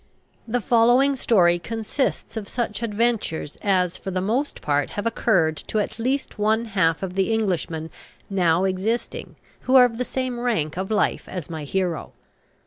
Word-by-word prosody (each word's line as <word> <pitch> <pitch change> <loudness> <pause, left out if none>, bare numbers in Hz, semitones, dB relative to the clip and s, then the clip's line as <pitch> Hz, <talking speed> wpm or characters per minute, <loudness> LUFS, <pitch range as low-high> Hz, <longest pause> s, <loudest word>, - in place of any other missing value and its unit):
The 240 +2 0
following 245 +5 +4
story 175 -9 +3
consists 225 - -3
of 215 -3 -4
such 235 -3 -3
adventures 220 -9 -1
as 185 -3 +1
for - - -6
the 185 -1 -1
most 235 +10 -1
part 145 -1 0
have 205 - -2
occurred 180 -9 +2
to - - -4
at 210 - -2
least 260 0 -2
one 220 +2 +2
half 185 -6 +1
of 185 -2 -3
the 195 +3 +1
Englishmen 170 -7 -1 0.4
now 180 -3 +2
existing 195 +5 -2 0.2
who 260 - +1
are 255 -1 +9
of 230 -1 -3
the - - +1
same 255 -1 -3
rank 195 -12 -1
of 190 +2 -3
life 215 - 0
as 175 -3 -6
my 155 -2 -5
hero. 180 0 -2
205 Hz, 165 wpm, -23 LUFS, 180-235 Hz, 0.4 s, are